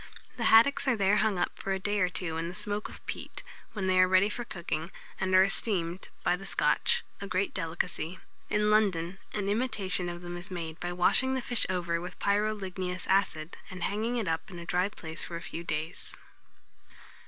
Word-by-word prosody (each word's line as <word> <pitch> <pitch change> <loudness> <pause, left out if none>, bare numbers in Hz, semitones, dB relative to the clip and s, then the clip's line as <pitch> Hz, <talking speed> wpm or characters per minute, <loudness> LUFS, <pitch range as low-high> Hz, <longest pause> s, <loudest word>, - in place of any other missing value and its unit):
The 235 - -2
haddocks 230 +6 +6
are 255 - +4
there 200 0 +3
hung 215 -3 +2
up 175 - -1
for 195 - -1
a 190 - -1
day 205 +2 0
or 185 -2 +3
two 165 -1 -1
in 165 +1 -2
the 180 - -8
smoke 210 0 -3
of - - -13
peat, - - -5 0.3
when 200 -4 -2
they 185 0 +3
are 185 - +7
ready 185 +2 +5
for 240 - -3
cooking, 170 -5 -4 0.3
and 185 -1 +2
are 185 - +8
esteemed, 190 -3 +1
by 175 - +3
the 195 +2 -9
Scotch, - - +2 0.2
a 200 - -4
great 190 +1 0
delicacy. 170 0 -2 0.3
In 210 0 +2
London, 195 -4 +2
an 205 -2 -1
imitation 200 -5 0
of 175 0 -7
them 175 0 -5
is 175 +3 -7
made 165 -3 -5
by 175 - -3
washing 255 +9 +3
the - - 0
fish 245 -2 0
over 170 -2 0
with 180 - -7
pyroligneous 195 -3 -1
acid, 185 -4 +1
and 185 -2 -6
hanging 220 +4 0
it 220 -5 -1
up 160 0 -1
in 180 - -9
a 170 - -7
dry 180 +3 +1
place 165 -5 -4
for 170 - -4
a - - -3
few 170 - -5
days. 160 +1 -2
185 Hz, 205 wpm, -30 LUFS, 175-205 Hz, 0.3 s, are